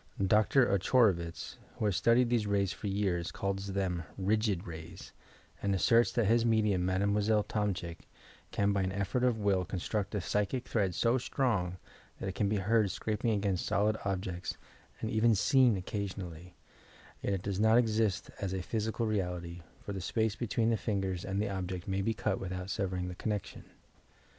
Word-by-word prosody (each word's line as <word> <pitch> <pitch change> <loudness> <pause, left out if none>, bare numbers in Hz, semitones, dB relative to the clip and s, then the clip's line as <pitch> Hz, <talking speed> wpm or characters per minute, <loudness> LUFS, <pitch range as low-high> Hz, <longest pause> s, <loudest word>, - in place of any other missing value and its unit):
Dr. 110 +6 +4
Ochorovitz, 95 -4 +1 0.2
who - - -1
has 100 -3 +1
studied 120 +3 +3
these 115 -4 +2
rays 100 -2 +1
for - - -6
years, 95 -4 -1
calls 100 0 -3
them 95 -3 -1 0.2
"rigid 100 -1 +1
rays" 80 -1 -9 0.5
and 100 -1 +1
that 115 +3 +3
his 115 +3 +4
medium, 105 -5 +2
Mademoiselle 100 +3 +2
Tomczyk, 100 -6 -2 0.5
can 100 0 +1
by 100 - +1
an 95 0 -1
effort 100 +5 -1
of 125 -3 +3
will 100 -3 +2
construct 100 +3 -3
a - - +1
psychic 105 +7 -1
thread 95 -6 0
so 120 +2 +2
strong 100 -9 0 0.4
that - - -4
it 95 - -3
can 100 0 0
be 105 - +1
heard 105 +1 +2
scraping 110 +4 -2
against 100 -4 0
solid 105 +1 +2
ohjecta 95 -3 -3 0.4
and 110 - -2
even 110 +1 +4
seen 115 +2 +4
occasionally, 90 -3 -5 0.3
— - - -24
yet 100 - -1
it 95 -1 -3
does 100 -1 -2
not 110 +2 +5
exist 110 -5 +1
as 95 -2 -2
a - - -1
physi 110 +4 -2
cal 115 - +1
reality, 90 -5 -2 0.2
for 100 - -4
the 95 - -4
space 110 +3 0
between 115 0 0
the 115 - +2
fingers 95 -5 -2
and 95 -1 -2
the 105 - 0
object 95 -2 -4
may 95 0 0
be 115 +3 0
cut - - -1
without 90 0 -4
severing 95 -3 -2
the 90 - -5
connection 105 +2 -4
100 Hz, 175 wpm, -32 LUFS, 95-110 Hz, 0.5 s, not